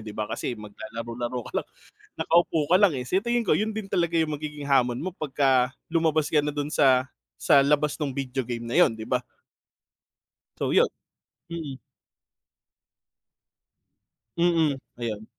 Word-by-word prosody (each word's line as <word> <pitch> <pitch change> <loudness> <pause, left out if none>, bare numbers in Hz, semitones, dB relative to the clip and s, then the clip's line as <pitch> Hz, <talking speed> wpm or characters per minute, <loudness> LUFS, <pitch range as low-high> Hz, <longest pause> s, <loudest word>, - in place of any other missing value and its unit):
'di 105 -1 -9
ba? 110 - -1
Kasi 120 +2 -4
maglalaro-laro 115 +3 -6
ka - - -10
lang, - - -13 0.6
nakaupo 165 -3 +2
ka 180 - +7
lang 200 -4 +4
eh. 130 - -3
Sa 180 +9 0
tingin 235 +3 0
ko 205 - +2
yun 215 +1 -1
din 210 -3 -5
talaga 170 -1 0
yung 160 -3 +1
magiging 150 -1 -6
hamon 125 -3 +2
mo 185 - -2
pagka 135 -6 +1 0.2
lumabas 160 -2 +1
ka 155 - +3
na 150 - -2
dun 145 0 -3
sa 130 -3 +3 0.3
sa 140 -1 +4
labas 150 0 +2
nung 145 -4 -2
video 130 -2 -3
game 120 -1 -4
na 115 +5 -2
yun, 175 -9 +5
'di 110 +1 -8
ba? 125 -1 0 1.3
So - - -1
yun, - - +5 0.6
mm. 155 -6 -6 2.6
Mm, 165 -4 +2 0.2
ayun. 110 -3 -4
140 Hz, 155 wpm, -26 LUFS, 125-165 Hz, 2.6 s, ka